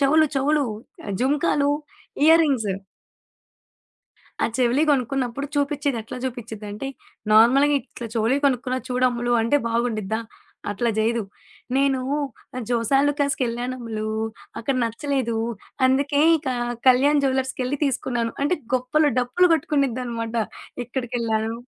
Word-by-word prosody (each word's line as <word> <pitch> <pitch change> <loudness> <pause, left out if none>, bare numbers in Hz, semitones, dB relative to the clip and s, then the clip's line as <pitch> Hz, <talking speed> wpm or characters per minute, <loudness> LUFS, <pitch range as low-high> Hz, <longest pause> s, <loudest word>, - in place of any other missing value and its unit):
చెవులు 310 +3 +5
చెవులు. 290 +2 +2 0.6
జుంకాలు, 285 +2 +2 0.6
ఇయరింగ్స్. 300 -9 +4 1.7
ఆ! - - +4
చెవిలియి 255 +4 +3
కొనుక్కున్నప్పుడు 270 0 -1
చూపించేది 285 -2 0
ఎట్లా 225 +3 -8
చూపించిదింటే, 220 -2 -6 0.4
నార్మల్‌గా 255 +7 +6
ఇట్లా 240 -2 -9
చెవిలియి 230 +5 +2
కొనుక్కున్న 255 -1 +1
చూడమ్ములు 250 -1 +1
అంటే 230 +6 +3
బాగుండిద్దా? 220 -3 -1 0.5
అట్లా 235 +4 0
చేయదు. 230 +2 +1 0.5
"నేనూ 270 -1 +2 0.7
జోసాలుకాస్కిళ్ళానమ్ములు, 245 -3 0 0.5
అక్కడ 265 +4 -1
నచ్చలేదు. 235 +1 -1 0.5
అందుకే 280 +2 +2 0.2
ఇక 295 -2 -8 0.4
కళ్యాణ్ 280 +3 +5
జువెలర్స్‌కెళ్ళి 265 0 -1
తీసుకున్నాను." 245 -3 -1
అంటే 345 +5 +1 0.2
గొప్పలు, 275 +5 +2
డప్పులు 250 +9 +3
కొట్టుకునిద్దనమాట. 255 -7 -1 0.5
ఎక్కడికెళ్ళాను 230 -3 -2
255 Hz, 90 wpm, -23 LUFS, 235-280 Hz, 1.7 s, నార్మల్‌గా